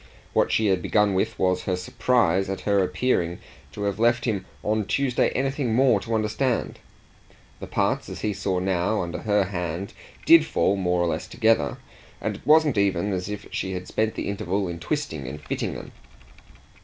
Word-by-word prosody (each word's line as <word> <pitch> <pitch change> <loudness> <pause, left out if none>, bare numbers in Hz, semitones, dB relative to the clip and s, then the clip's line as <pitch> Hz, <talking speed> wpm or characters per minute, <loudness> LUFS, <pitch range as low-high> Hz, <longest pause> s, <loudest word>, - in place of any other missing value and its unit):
What - - +2
she 110 - +2
had 95 -3 +2
begun 105 0 +2
with 95 - -1
was 90 -1 +1
her 90 - 0
surprise 95 0 +1
at 95 - -3
her 100 -2 +2
appearing 90 -3 0 0.3
to 105 - -6
have 100 0 -1
left 120 +1 +3
him 100 -6 -2 0.2
on 110 0 0
Tuesday 130 +2 +1
anything 135 -3 0
more 125 -4 +4
to 115 +2 -3
understand. 110 +3 -1 0.8
The - - -7
parts, - - 0
as - - -7
he 105 - 0
now - - -1
saw, 95 +1 0
under 85 0 -5
her 105 -2 +2
hand, 90 0 -4 0.3
did 165 -1 +8
fall 100 -9 +1
more 90 -2 0
or - - +1
less 80 -1 -2
together, 110 - +1 0.4
and - - -2
it - - -18
wasn't 150 -6 +5
even 100 0 +1
as 90 +1 -3
if 105 -1 -6
she 95 - -3
had 90 0 -5
spent 110 0 -1
the - - -3
interval 100 -1 -1
in 85 -1 -5
twisting 85 - -3
and 70 +3 -6
fitting 75 - -3
them. - - -9
100 Hz, 185 wpm, -25 LUFS, 90-115 Hz, 0.8 s, did